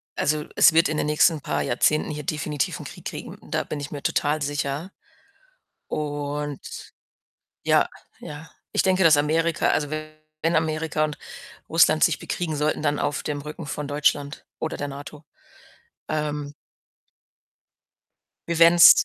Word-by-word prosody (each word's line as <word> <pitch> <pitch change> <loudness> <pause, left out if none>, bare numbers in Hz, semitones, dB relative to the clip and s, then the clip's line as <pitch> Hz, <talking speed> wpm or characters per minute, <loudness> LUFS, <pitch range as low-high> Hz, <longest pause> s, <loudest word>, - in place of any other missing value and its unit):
also, 150 0 0
es 170 - +7
wird 165 +1 +4
in 155 - -1
den - - 0
nächsten 150 0 +3
paar - - -1
Jahrzehnten 150 +5 +1
hier 150 0 -5
definitiv 150 -1 -2
'n - - -8
Krieg - - -10
kriegen, - - -6
da - - 0
bin 150 - -5
ich 145 0 -6
mir 145 - -6
total 150 +1 +1
sicher. 145 +4 -2 1.0
Und 145 -1 -4 0.7
Ja, - - +4 0.3
ja. 150 +2 -9 0.2
Ich - - +3
denke, 190 0 +2
dass 160 -4 +7
Amerika 160 +3 +1
also, 145 -2 0
wenn 155 +1 -4
Amerika 160 -1 0
und 150 -1 -4 0.5
Russland 160 -1 +5
sich 165 - +2
bekriegen 170 -3 -3
sollten, 150 +1 0
dann 145 -1 +1
auf 145 - -1
dem 145 -1 -2
Rücken 150 +1 -7
von 145 0 -4
Deutschland 145 0 0 0.2
oder 160 - -2
der 145 - -4
NATO. 145 +2 -9 0.9
Ähm 150 -1 -2 1.9
Wir 170 -1 -1
werden's 170 +1 +8
150 Hz, 145 wpm, -24 LUFS, 145-160 Hz, 1.9 s, werden's